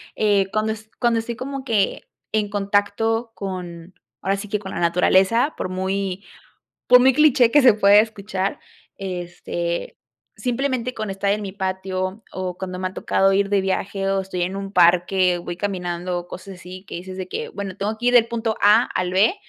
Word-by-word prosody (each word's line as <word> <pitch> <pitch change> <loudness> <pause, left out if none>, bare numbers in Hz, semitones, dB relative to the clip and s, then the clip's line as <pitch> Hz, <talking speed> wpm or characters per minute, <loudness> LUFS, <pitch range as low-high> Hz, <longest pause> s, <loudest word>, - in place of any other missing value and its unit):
eh, 205 -3 +2
cuando 215 0 +1
es 220 0 -8
cuando 235 -1 +2
estoy 230 +1 -4
como 270 +3 -6
que, 215 -5 0 0.3
en 210 -1 0
contacto 205 +3 0
con 180 -2 -6 0.3
ahora 195 +1 0
sí 210 - -7
que 210 - -1
con 190 -2 -8
la - - -4
naturaleza, 190 - +3
por - - -2
muy 190 +1 -2 0.6
por 250 0 +8
muy 260 +1 +5
cliché 270 -4 +5
que 290 +3 +5
se 245 -4 +8
pueda 205 -1 +5
escuchar, 200 -3 -2 0.4
este, 175 -2 -4 0.4
simplemente 255 -1 -2
con 215 -2 -4
estar 195 +1 0
en 210 - 0
mi 195 - -5
patio, 190 +1 -3
o 185 -1 -4
cuando 185 -1 -5
me 185 - -1
ha 185 - -9
tocado 195 0 +2
ir 200 0 +2
de 200 -1 +2
viaje 195 0 -2
o 195 0 +1
estoy 185 -1 -5
en 185 +2 -3
un 195 0 -5
parque 180 +1 +4
o 175 - -9
voy 175 - -5
caminando, 180 -2 -3
cosas 190 +1 -9
así, 185 +1 -11
que - - -8
dices 185 +2 -7
de 185 -1 -5
que: - - -5
"Bueno, 195 -2 -6
tengo 215 +2 -2
que 245 - 0
ir 245 - +3
del 230 -1 +6
punto 225 -1 -2
A 215 +4 +6
al 180 0 -2
B, 200 - +3
195 Hz, 195 wpm, -22 LUFS, 185-220 Hz, 0.6 s, por